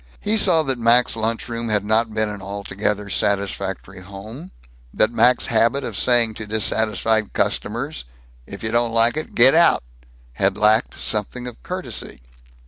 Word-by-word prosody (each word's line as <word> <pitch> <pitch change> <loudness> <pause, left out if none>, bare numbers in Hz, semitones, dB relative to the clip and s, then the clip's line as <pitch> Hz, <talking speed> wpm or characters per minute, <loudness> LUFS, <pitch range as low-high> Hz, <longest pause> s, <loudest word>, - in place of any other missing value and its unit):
He 210 +2 0
saw 165 -6 +4
that 135 -4 -1
Mac's 115 +1 +3
lunch 115 0 -3
room 115 -1 -5
had 105 -2 0
not 110 +1 +1
been 110 0 -1
an 105 -1 -7
altogether 100 +1 -4
satisfactory 100 -1 -3
home; 110 - -10 0.4
that 110 - +1
Mac's 125 +1 +3
habit 115 +5 +1
of - - -5
saying 120 -3 +2
to 110 0 -8
dissatisfied 110 0 0
customers, 130 - -2 0.4
"If - - -10
you 110 - -1
don't 120 0 0
like 115 +2 +4
it, 155 - -6
get 125 +3 +6
out," 170 - +4 0.5
had - - 0
lacked 110 +1 +2
something 110 +3 -2
of 125 -2 -9
courtesy. 180 - -5
110 Hz, 155 wpm, -21 LUFS, 105-120 Hz, 0.5 s, get